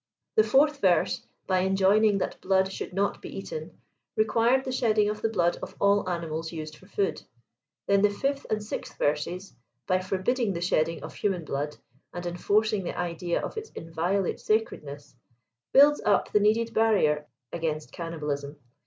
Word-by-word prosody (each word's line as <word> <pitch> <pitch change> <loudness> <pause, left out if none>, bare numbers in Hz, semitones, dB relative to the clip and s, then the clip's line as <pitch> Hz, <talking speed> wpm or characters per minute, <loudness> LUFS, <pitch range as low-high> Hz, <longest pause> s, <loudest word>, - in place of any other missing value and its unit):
The 435 - +6
fourth 290 -1 +3
verse, 180 -4 +2 0.2
by 185 -1 +2
enjoining 195 +3 +3
that 190 - -3
blood 190 0 +2
should - - -5
not 195 +2 -1
be - - -8
eaten, 475 -1 -7 0.4
required 230 +4 +3
the 260 - -2
sheddipg 220 -5 +2
of 210 0 -4
the 225 - +1
blood 175 -5 +1
of - - -7
all 200 -1 +3
animals 165 -2 -3
used 155 -2 -6
for 185 - -18
food; 200 -1 -1 0.6
then 200 0 +3
the 210 - +5
fifth 275 +7 -2
and 215 -1 -1
sixth 210 - -6
verses, 150 +6 -1 0.3
by 185 0 +2
forbidding 195 +4 0
the 170 - -3
shedding 165 -2 0
of - - -7
human 185 -5 -1
blood, 145 +1 -3 0.4
and 175 0 -5
enforcing 205 +4 +1
the - - -5
idea 175 0 -2
of - - -7
its 440 0 -5
inviolate 170 +4 -1
sacredness, 145 - -2 0.6
build 290 +2 +6
up 205 - +2
the 210 - +4
needed 225 +2 +2
barrier 155 -10 +2 0.3
against 155 -2 -3
cannibalism. 150 -4 -4
190 Hz, 160 wpm, -27 LUFS, 165-215 Hz, 0.6 s, The